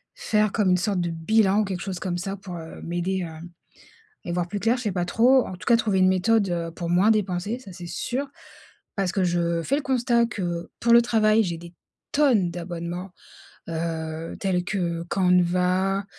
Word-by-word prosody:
Faire 215 Hz, -, +1 dB
comme 205 Hz, -4 st, +1 dB
une 180 Hz, -, +4 dB
sorte 195 Hz, 0 st, 0 dB
de 170 Hz, -, -1 dB
bilan 200 Hz, +5 st, +2 dB
ou -, -, 0 dB
quelque 190 Hz, -2 st, -4 dB
chose 190 Hz, -3 st, -4 dB
comme 175 Hz, -1 st, -2 dB
ça 195 Hz, +1 st, -4 dB
pour, 185 Hz, -3 st, -8 dB
heu, 160 Hz, 0 st, -9 dB
m'aider 175 Hz, +2 st, -2 dB
à 160 Hz, -1 st, -8 dB, 0.9 s
y 175 Hz, -, -3 dB
voir 175 Hz, 0 st, -1 dB
plus 205 Hz, +3 st, -3 dB
clair, 230 Hz, +4 st, +2 dB
je -, -, -5 dB
sais 210 Hz, -, 0 dB
pas 175 Hz, -1 st, -1 dB
trop. 250 Hz, +6 st, +4 dB
En -, -, -7 dB
tout 170 Hz, -, -13 dB
cas, 235 Hz, -, +6 dB
trouver 210 Hz, -4 st, +1 dB
une 185 Hz, -, +5 dB
méthode, 200 Hz, +3 st, +2 dB
heu, 170 Hz, -1 st, -2 dB
pour 170 Hz, 0 st, -5 dB
moins 190 Hz, +5 st, +4 dB
dépenser, 205 Hz, +2 st, -1 dB
ça 195 Hz, -7 st, -11 dB
c'est 175 Hz, 0 st, -9 dB
sûr. 270 Hz, +9 st, -3 dB, 0.7 s
Parce 195 Hz, -3 st, 0 dB
que 190 Hz, -, 0 dB
je 170 Hz, -1 st, 0 dB
fais 275 Hz, -, 0 dB
le 295 Hz, -, -2 dB
constat 240 Hz, -3 st, +2 dB
que 175 Hz, -6 st, -4 dB
pour 235 Hz, 0 st, +3 dB
le 235 Hz, -, +8 dB
travail, 220 Hz, -2 st, +3 dB
j'ai 170 Hz, -2 st, -3 dB
des 170 Hz, +1 st, -12 dB, 0.4 s
tonnes 245 Hz, -12 st, +3 dB
d'abonnements, 175 Hz, +1 st, -5 dB, 0.6 s
heu, 160 Hz, 0 st, -4 dB
tels 180 Hz, -3 st, 0 dB
que 170 Hz, -4 st, -2 dB
Canva, 180 Hz, +1 st, +2 dB
185 Hz, 200 wpm, -24 LUFS, 175-215 Hz, 0.9 s, le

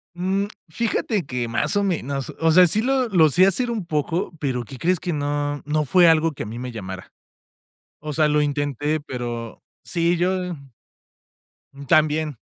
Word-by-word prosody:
Mm, 190 Hz, +3 st, 0 dB, 0.2 s
fíjate 210 Hz, +1 st, -1 dB
que 125 Hz, -2 st, -3 dB
más 115 Hz, -, 0 dB
o 200 Hz, -, +2 dB
menos, 140 Hz, -7 st, -2 dB
o 165 Hz, 0 st, +3 dB
sea, 180 Hz, +2 st, +7 dB
sí 215 Hz, +6 st, 0 dB
lo 260 Hz, 0 st, +1 dB
lo 165 Hz, -7 st, +4 dB
sé 180 Hz, +6 st, +5 dB
hacer 235 Hz, +5 st, 0 dB
un 215 Hz, -6 st, -3 dB
poco, 165 Hz, +3 st, -2 dB
pero 125 Hz, -4 st, -2 dB
¿qué 130 Hz, -, -10 dB
crees? 180 Hz, +4 st, +1 dB
Que 175 Hz, -3 st, -3 dB
no 145 Hz, 0 st, -2 dB
no 150 Hz, 0 st, 0 dB
fue 175 Hz, +4 st, +5 dB
algo 160 Hz, -1 st, +3 dB
que -, -, -5 dB
a -, -, -7 dB
mí 115 Hz, +3 st, -7 dB
me 125 Hz, 0 st, -5 dB
llamara. 95 Hz, -3 st, -8 dB, 0.9 s
O 150 Hz, 0 st, -5 dB
sea, 155 Hz, 0 st, +3 dB
lo 150 Hz, 0 st, +2 dB
intenté, 145 Hz, +1 st, -1 dB
pero 120 Hz, -4 st, -6 dB, 0.2 s
sí, 170 Hz, 0 st, 0 dB
yo 180 Hz, 0 st, -1 dB, 1.3 s
también. 155 Hz, -3 st, +2 dB
155 Hz, 175 wpm, -22 LUFS, 140-180 Hz, 1.3 s, sea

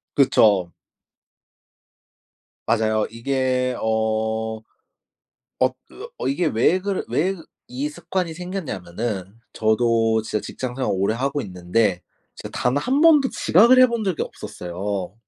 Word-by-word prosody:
그쵸. 100 Hz, -10 st, +4 dB, 1.9 s
맞아요. 110 Hz, -1 st, +1 dB
이게 125 Hz, +1 st, -1 dB
어 110 Hz, 0 st, -1 dB, 1.0 s
엊 130 Hz, 0 st, +2 dB
그 450 Hz, +4 st, -10 dB
어 475 Hz, -, -3 dB
이게 225 Hz, -11 st, 0 dB
왜 150 Hz, +7 st, +3 dB
그래 195 Hz, 0 st, -2 dB
왜 190 Hz, +5 st, 0 dB, 0.3 s
이 135 Hz, +4 st, -3 dB
습관이 175 Hz, +2 st, -3 dB
생겼냐면은 110 Hz, -, -5 dB, 0.2 s
저도 115 Hz, 0 st, +2 dB
진짜 110 Hz, -2 st, -3 dB
직장생활을 130 Hz, +3 st, -4 dB
오래 100 Hz, +3 st, 0 dB
하고 140 Hz, +4 st, -1 dB
있는데 90 Hz, -1 st, -1 dB, 0.3 s
제가 -, -, -9 dB
단 125 Hz, +2 st, +1 dB
1 255 Hz, -, +1 dB
번도 300 Hz, -4 st, +6 dB
지각을 235 Hz, +9 st, +5 dB
해 255 Hz, -, +8 dB
본 235 Hz, -2 st, -3 dB
적이 190 Hz, -6 st, -1 dB
없었어요. 95 Hz, +2 st, -5 dB
120 Hz, 230 characters per minute, -22 LUFS, 110-170 Hz, 1.9 s, 해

